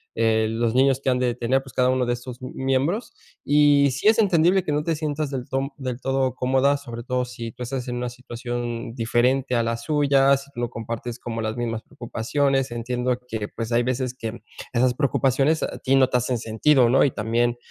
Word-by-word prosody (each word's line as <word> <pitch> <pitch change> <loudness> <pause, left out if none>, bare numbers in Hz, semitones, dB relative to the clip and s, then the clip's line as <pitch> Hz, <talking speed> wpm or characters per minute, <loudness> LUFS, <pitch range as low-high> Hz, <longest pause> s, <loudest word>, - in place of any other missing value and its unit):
eh, 110 -1 +2
los 115 +1 -1
niños 135 0 +3
que - - +1
han 125 - +2
de 125 -1 +1
tener, 125 +3 0
pues, 130 -3 -13
cada 125 0 +2
uno 130 -1 +1
de 120 - 0
estos 120 0 -7
miembros, 135 - -1 0.3
y 145 -1 +4
si 135 +10 -1
es 220 +1 +5
entendible 185 -2 +4
que 155 - -2
no 150 +1 0
te 165 +1 0
sientas 150 -1 -3
del 130 -2 -5
ton 135 +1 -1
del 130 -3 -4
todo 135 -1 0
cómoda, 135 +3 +2
sobre 120 -4 -8
todo 125 +1 -1
si 120 -2 -7
tú 125 - -8
estás 125 +1 -4
en 125 - -3
una 125 0 -2
situación 120 -1 -5
diferente 125 +2 +1
a 120 - +2
la 115 0 -1
suya, 140 +2 +3
si 140 +1 -12
tú - - -7
no 120 - -1
compartes 115 0 -5
como 115 -2 -5
las 110 +1 -3
mismas 115 -2 -2
preocupaciones. 135 +4 -1
Entiendo 125 +1 -2
que, 110 -3 -4
pues, 115 +2 -6
hay 120 +1 +3
veces 125 0 -1
que 115 -1 -6 0.3
esas 125 +1 +2
preocupaciones 135 +2 +1
a - - -4
ti 135 0 +2
no 135 -1 +5
te 125 - +2
hacen 125 0 -1
sentido, 120 +4 +3
¿no?, 130 - +5
y - - +4
también 120 +1 0
125 Hz, 215 wpm, -23 LUFS, 120-135 Hz, 0.3 s, es